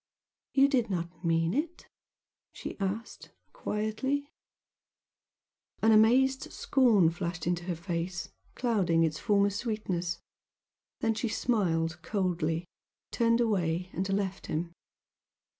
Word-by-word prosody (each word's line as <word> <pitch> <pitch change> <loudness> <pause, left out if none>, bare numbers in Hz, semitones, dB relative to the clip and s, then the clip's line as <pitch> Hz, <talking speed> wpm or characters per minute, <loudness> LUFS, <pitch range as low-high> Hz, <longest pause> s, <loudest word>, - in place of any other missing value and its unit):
"You 275 0 +6
did 250 -5 +1
not 170 -2 -4
mean 165 0 +2
it?" 320 +6 -3 0.7
she - - -6
asked, 205 +4 -4 0.2
quietly. 265 - -2 1.5
An 225 - +6
amazed 255 +5 +4
scorn 220 - +4
flashed 175 -1 -4
into 175 0 -1
her 175 -2 -2
face, 170 +1 -3 0.3
clouding 190 -9 +2
its 155 -2 0
former 200 -2 +3
sweetness 200 -5 -2 0.8
then 225 0 +2
she 225 +2 -2
smiled 180 -8 0
coldly, 175 -4 -1 0.5
turned 230 0 +3
away 180 -5 0
and 190 +2 -2
left 195 -1 -2
him. 170 +2 -3
195 Hz, 110 wpm, -30 LUFS, 170-230 Hz, 1.5 s, You